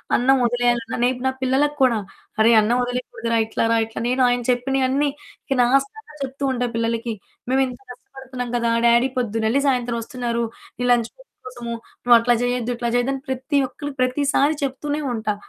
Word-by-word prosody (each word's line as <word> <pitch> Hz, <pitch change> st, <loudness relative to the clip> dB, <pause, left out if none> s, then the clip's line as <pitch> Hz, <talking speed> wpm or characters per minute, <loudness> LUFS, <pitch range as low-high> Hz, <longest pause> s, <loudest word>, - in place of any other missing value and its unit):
అన్నం 265 Hz, +2 st, +4 dB
వదిలేయాలన్న 240 Hz, -1 st, +1 dB
రేపు 250 Hz, 0 st, 0 dB
నా -, -, +2 dB
పిల్లలకి 270 Hz, +3 st, +1 dB
కూడా, 250 Hz, -3 st, +4 dB, 0.4 s
అరె! 220 Hz, +2 st, +6 dB
అన్నం 230 Hz, +3 st, +1 dB
వదిలేయకూడదురా! 245 Hz, -2 st, -2 dB
ఇట్లా 220 Hz, -, -2 dB
రా 230 Hz, -, +4 dB
ఇట్లా 225 Hz, 0 st, -7 dB
నేను 255 Hz, +1 st, +1 dB
ఆయన 245 Hz, 0 st, +1 dB
చెప్పినయన్నీ 270 Hz, +3 st, +1 dB, 0.4 s
ఇక 270 Hz, -, -1 dB
లాస్ట్ 275 Hz, +3 st, +3 dB
దాకా 440 Hz, -9 st, -14 dB
చెప్తు 270 Hz, +1 st, -6 dB
ఉంటా 245 Hz, -1 st, -1 dB
పిల్లలకి. 230 Hz, 0 st, -1 dB, 0.4 s
మేమింత 260 Hz, -2 st, +1 dB
కష్టపడుతున్నాం 250 Hz, -1 st, -8 dB
కదా! 235 Hz, -1 st, +1 dB, 0.2 s
డ్యాడీ 235 Hz, +2 st, +4 dB
పొద్దునెళ్లి 225 Hz, +2 st, 0 dB
సాయంత్రం 245 Hz, -3 st, 0 dB
వస్తున్నారు. 235 Hz, -1 st, -2 dB, 0.3 s
నీ 245 Hz, -, -3 dB
లంచ్ 235 Hz, -2 st, +2 dB
బాక్స్ -, -, -22 dB
కోసమూ 240 Hz, -2 st, -6 dB, 0.3 s
నువ్వట్లా 240 Hz, 0 st, +5 dB
చేయొద్దు, 245 Hz, -1 st, -1 dB
ఇట్లా 235 Hz, 0 st, -2 dB
చెయ్యద్దు 245 Hz, +2 st, +1 dB
అని 270 Hz, -, -9 dB
ప్రతి 265 Hz, +3 st, 0 dB
ఒక్కళ్ళికి 285 Hz, +1 st, -8 dB
ప్రతిసారి 285 Hz, +3 st, +1 dB
చెప్తూనే 290 Hz, +2 st, -2 dB
ఉంటా. 215 Hz, -2 st, -2 dB
245 Hz, 165 wpm, -22 LUFS, 235-270 Hz, 0.4 s, అరె